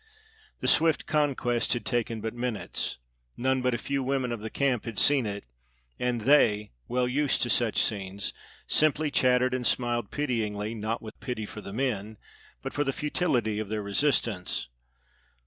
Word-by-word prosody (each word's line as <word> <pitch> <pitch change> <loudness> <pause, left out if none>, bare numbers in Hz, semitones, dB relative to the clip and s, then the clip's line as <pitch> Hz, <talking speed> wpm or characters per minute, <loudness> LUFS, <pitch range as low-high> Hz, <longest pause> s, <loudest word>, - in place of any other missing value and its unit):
The - - -1
swift 160 -1 +5
conquest 135 -6 +1
had 120 - -3
taken 115 -3 -1
but 110 0 -3
minutes; 120 -3 -3 0.4
none 130 +1 +1
but 125 -1 +1
a - - -1
few 140 +3 -2
women 130 -1 -1
of 120 - -3
the 110 +1 -5
camp 130 -4 0
had 115 -3 -6
seen 140 -5 +4
it; 100 0 -5 0.6
and 125 -2 0
they, 105 -5 +4 0.2
well 125 0 +1
used 140 +3 +1
to 120 - 0
such 120 -3 +2
scenes, 100 -2 -1 0.3
simply 155 0 +2
chattered 125 -1 +3
and 125 -2 0
smiled 120 -2 0
pityingly, 110 -7 -2
not 110 +1 -3
with 110 -1 -10
pity 120 -5 -4
for 105 - -8
the 100 - -8
men, 110 -3 -2 0.5
but - - -4
for 145 - +1
the 135 -1 -1
futility 130 -9 0
of 110 -2 -4
their 105 -1 -2
resistance. 100 - 0
120 Hz, 165 wpm, -28 LUFS, 110-135 Hz, 0.6 s, swift